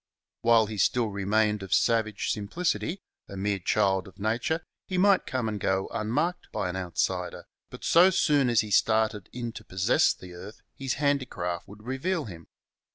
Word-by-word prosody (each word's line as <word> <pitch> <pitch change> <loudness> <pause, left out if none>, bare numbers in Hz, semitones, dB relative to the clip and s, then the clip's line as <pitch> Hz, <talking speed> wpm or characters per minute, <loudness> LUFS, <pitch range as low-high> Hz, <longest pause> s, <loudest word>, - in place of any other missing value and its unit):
While 115 -1 +5
he 105 -1 -6
still 115 +3 +2
re 100 0 -4
mained 105 0 +2
of 95 -1 0
savage 110 -3 +1
simplicity, 170 - -2 0.3
a 100 - -7
mere 100 0 -1
child 95 0 +1
of 95 - -15
nature, 115 +10 -1 0.2
he 185 - -2
might 195 +1 +4
come 130 -3 -1
and 105 -1 -3
go 95 0 0
unmarked 150 +12 -1
by - - -2
an 90 - -4
outsider, 90 0 -2 0.2
but - - -11
so 175 +3 +6
soon 150 -8 +3
as 120 -2 +4
he 105 -1 -7
started 110 -2 +2
in 120 -1 -4
to 110 - -10
possess 95 -1 +2
the 90 -1 -12
earth 95 +5 -11
his 135 -1 -3
handicraft 130 - -1
would 105 +2 -13
reveal 145 +7 -2
him. 85 -6 -10
110 Hz, 175 wpm, -27 LUFS, 95-130 Hz, 0.3 s, so